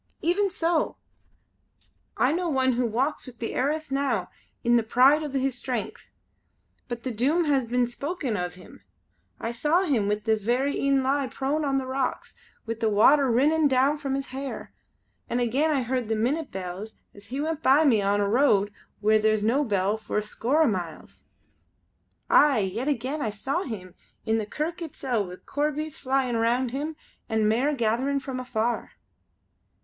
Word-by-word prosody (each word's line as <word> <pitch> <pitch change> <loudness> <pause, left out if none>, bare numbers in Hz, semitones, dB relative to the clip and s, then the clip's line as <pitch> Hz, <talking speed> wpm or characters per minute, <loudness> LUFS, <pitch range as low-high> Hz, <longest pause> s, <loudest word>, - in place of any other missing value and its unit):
"Even 380 +5 +2
so! 335 -2 0 1.2
I 255 - +3
know 345 +2 -1
one 260 -3 +2
who 245 0 +1
walks 260 +7 -1
the 235 -2 -6
airth 300 +2 -1
now 275 0 -1 0.3
in 240 - +1
all 240 - +6
the - - +3
pride 255 +7 +4
o' 300 - -3
his 270 -1 0
strength. 245 -2 -4 0.8
But 240 -1 -5
the 260 - -2
Doom 285 +10 +1
has 275 -4 +2
been 245 +1 +2
spoken 275 0 -3
of 180 -2 -3
him. 185 - -15 0.6
I 230 - -3
saw 300 +10 +2
him 255 - +1
with 210 0 -1
these 220 -3 +1
verra 255 +6 +1
een 275 -1 +1
lie 275 +1 +1
prone 280 +4 -2
on 275 -2 +1
rocks, 260 0 -2 0.3
wi' 230 -1 -3
the 225 -2 +2
water 265 +7 +5
rinnin' 295 +6 +3
down 275 +3 +2
from 275 -2 -2
his 275 0 -4
hair. 270 +1 -6 0.6
An' 240 - 0
again 255 +6 +1
I 280 -4 +1
heard 245 -2 -2
the 220 - +1
minute 275 +8 -1
bells 190 +3 -6 0.2
as 200 0 -15
he 265 +3 -4
went 315 +1 -2
by 285 +3 +5
me 230 -7 +4
on 200 +1 +1
a 200 - +1
road 205 -4 +3 0.3
where 215 +1 +4
is 215 -1 +2
no 250 +7 +2
bell 205 -3 0
for 220 - -4
a 210 - +1
score 255 +8 +1
o' - - +3
miles. 175 -7 -5 1.0
Aye, 290 -3 +5
an' 190 - -1
yet 235 +8 -3
again 280 +2 -1
I 225 - 0
saw 265 - -2
him 195 - -7 0.3
in 225 0 +1
the 210 - -4
kirk 320 - -3
itsel' 255 - -2
wi' 180 - -8
corbies 300 +1 -2
flyin' 260 -3 0
round 235 +2 +1
him, 295 +4 -3 0.3
an' 220 -1 +2
mair 245 +7 +2
gatherin' 255 +4 0
from 265 -2 -5
afar!" 240 -2 -2
255 Hz, 180 wpm, -26 LUFS, 220-285 Hz, 1.2 s, all